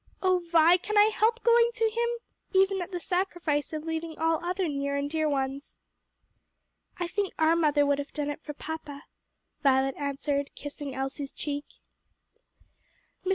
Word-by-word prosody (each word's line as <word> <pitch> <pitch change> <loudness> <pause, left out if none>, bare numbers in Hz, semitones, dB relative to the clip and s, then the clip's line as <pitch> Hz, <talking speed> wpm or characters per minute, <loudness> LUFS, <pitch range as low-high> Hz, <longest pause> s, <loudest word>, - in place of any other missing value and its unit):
O 370 -1 +4
Vi, 340 0 +5
can 425 +3 -3
I 420 +1 +7
help 455 +3 +2
going 470 0 +5
to 455 - -1
him, 470 +2 0 0.5
even 385 0 +3
at 355 - -5
the 355 - -3
sacrifice 350 -5 -1
of 310 -1 -4
leaving 325 0 -4
all 325 0 +1
other 365 +1 -1
near 280 -1 -2
and 280 0 -1
dear 310 0 0
ones?" 275 0 -3 1.2
"I 350 - -2
think 390 +2 -2
our 320 +1 +4
mother 295 -3 +3
would 285 0 +2
have 285 - -5
done 295 -1 -2
it 290 - -8
for 295 -2 -7
papa," 305 -2 -7 0.6
Violet 270 -1 +3
answered, 280 0 -2
kissing 290 -1 -7
Elsie's 270 +1 -4
cheek. 290 0 -4 1.6
Mr. 375 - -2
315 Hz, 160 wpm, -28 LUFS, 285-360 Hz, 1.6 s, I